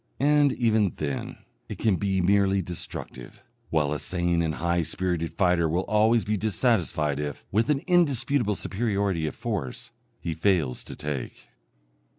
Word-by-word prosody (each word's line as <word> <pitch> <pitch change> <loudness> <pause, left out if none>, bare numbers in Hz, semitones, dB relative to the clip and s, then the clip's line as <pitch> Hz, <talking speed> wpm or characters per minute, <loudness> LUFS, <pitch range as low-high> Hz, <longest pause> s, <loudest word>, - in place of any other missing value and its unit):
And, 145 0 +4
even 110 -5 +2
then, 70 -3 -4 0.2
it - - -5
can 105 -5 +2
be 95 -1 0
merely 100 +1 +3
destructive, 80 -7 -6 0.3
while 75 -2 +1
a 75 - -3
sane 85 -2 0
and 80 -2 -1
high 85 +1 0
spirited 85 0 -2
fighter 90 -3 +3
will 85 +4 0
always 110 +3 +3
be 105 0 0
dissatisfied 90 - +1
if, 75 -1 -5
with 110 +7 +1
an 140 -2 +1
indisputable 140 - +2
superiority 100 -6 -1
of - - -5
force, 105 - -4 0.3
he 85 - -3
fails 80 -6 +1
to - - -8
take. 75 -4 -6
95 Hz, 150 wpm, -26 LUFS, 80-110 Hz, 0.3 s, And